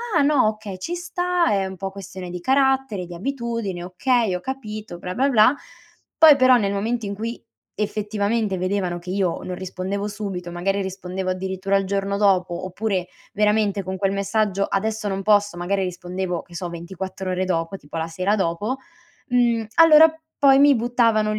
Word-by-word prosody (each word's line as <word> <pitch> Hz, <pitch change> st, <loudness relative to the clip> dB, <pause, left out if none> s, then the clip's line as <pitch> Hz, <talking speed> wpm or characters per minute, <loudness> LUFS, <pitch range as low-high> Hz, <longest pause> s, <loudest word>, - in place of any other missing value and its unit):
"Ah -, -, +5 dB
no, 285 Hz, -5 st, +4 dB
okay, 215 Hz, -3 st, -4 dB
ci 335 Hz, -, -4 dB
sta 355 Hz, 0 st, 0 dB
è 195 Hz, -2 st, +1 dB
un 190 Hz, -, -7 dB
po' 195 Hz, +1 st, -4 dB
questione 190 Hz, -2 st, -8 dB
di 180 Hz, 0 st, -5 dB
carattere, 265 Hz, -5 st, +1 dB
di 175 Hz, -, -9 dB
abitudine, 230 Hz, -4 st, -3 dB
okay 225 Hz, +4 st, +1 dB
ho -, -, -3 dB
capito, 215 Hz, -7 st, -6 dB
bla, 180 Hz, -, -5 dB
bla, 270 Hz, +2 st, +2 dB
bla." 235 Hz, 0 st, +5 dB, 0.6 s
Poi 315 Hz, -2 st, +9 dB
però 255 Hz, -1 st, +6 dB
nel 200 Hz, -4 st, 0 dB
momento 220 Hz, +3 st, -2 dB
in 200 Hz, -, -4 dB
cui 230 Hz, +3 st, -5 dB, 0.3 s
effettivamente 210 Hz, 0 st, -1 dB
vedevano 185 Hz, -1 st, -1 dB
che 180 Hz, -, -10 dB
io 190 Hz, -3 st, 0 dB
non 180 Hz, -, -5 dB
rispondevo 190 Hz, +2 st, -4 dB
subito, 195 Hz, -4 st, -5 dB
magari 195 Hz, +3 st, -1 dB
rispondevo 185 Hz, 0 st, -4 dB
addirittura 190 Hz, +1 st, -1 dB
al 195 Hz, -, -1 dB
giorno 200 Hz, +1 st, -1 dB
dopo, 185 Hz, -3 st, +1 dB
oppure 185 Hz, -1 st, -2 dB, 0.3 s
veramente 210 Hz, -1 st, +2 dB
con 190 Hz, +1 st, -4 dB
quel 195 Hz, 0 st, 0 dB
messaggio: 200 Hz, 0 st, 0 dB
"Adesso 215 Hz, +1 st, -2 dB
non 195 Hz, 0 st, -2 dB
posso." 205 Hz, -2 st, +3 dB
Magari 190 Hz, +3 st, -1 dB
rispondevo 180 Hz, 0 st, -3 dB
che 170 Hz, -, -15 dB
so 175 Hz, 0 st, -4 dB
24 185 Hz, +2 st, -6 dB
ore 185 Hz, 0 st, -1 dB
dopo, 165 Hz, +1 st, -2 dB
tipo 150 Hz, -1 st, -9 dB
la 160 Hz, 0 st, -2 dB
sera 185 Hz, +5 st, 0 dB
dopo, 200 Hz, +6 st, -1 dB, 0.5 s
mhmm, 240 Hz, -2 st, +2 dB
allora 320 Hz, -1 st, +8 dB, 0.3 s
poi 275 Hz, -2 st, +6 dB
mi 285 Hz, 0 st, +6 dB
buttavano 230 Hz, -2 st, +2 dB
200 Hz, 175 wpm, -22 LUFS, 185-225 Hz, 0.6 s, Poi